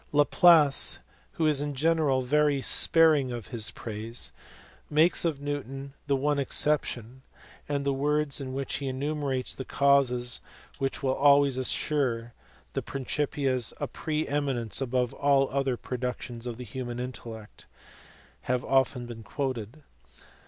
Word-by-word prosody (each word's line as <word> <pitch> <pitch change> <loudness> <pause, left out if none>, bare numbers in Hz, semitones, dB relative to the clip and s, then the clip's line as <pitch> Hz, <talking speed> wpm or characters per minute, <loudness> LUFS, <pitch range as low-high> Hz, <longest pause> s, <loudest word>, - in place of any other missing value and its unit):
Laplace, 150 0 +5 0.4
who 160 - 0
is 150 -2 +3
in 145 -1 -3
general 150 -3 +2
very 145 +2 +2
sparing 150 -1 +3
of 120 -4 -6
his 115 -2 -1
praise, 115 +1 -5 0.6
makes 155 +4 +3
of 155 -4 0
Newton 140 -1 -5
the 140 - +2
one 145 +2 +1
exception, 130 -3 0 0.5
and 140 -1 -1
the 140 - +2
words 145 +1 0
in 130 -1 -5
which 135 +1 -3
he 140 - -4
enumerates 135 -1 -2
the 130 - -6
causes 130 -3 +2 0.4
which 135 +1 -2
"will 130 -1 +2
always 140 -1 +5
assure 130 -1 +1
to 115 +1 -13 0.4
the - - -1
Principia 135 -1 -1 0.2
a - - -1
pre 155 -1 -3
eminence 135 -5 -1
above 125 -2 0
all 140 -1 +3
the 130 - -10
other 135 -2 0
pro 125 - -5
ductions 125 -1 -5
of 120 -2 -5
the 125 - -7
human 120 +1 -5
intellect" 115 -4 -8 0.8
have 125 0 0
been - - -10
often 120 -3 +1
quoted. 130 +3 -4
135 Hz, 145 wpm, -28 LUFS, 125-145 Hz, 0.8 s, Laplace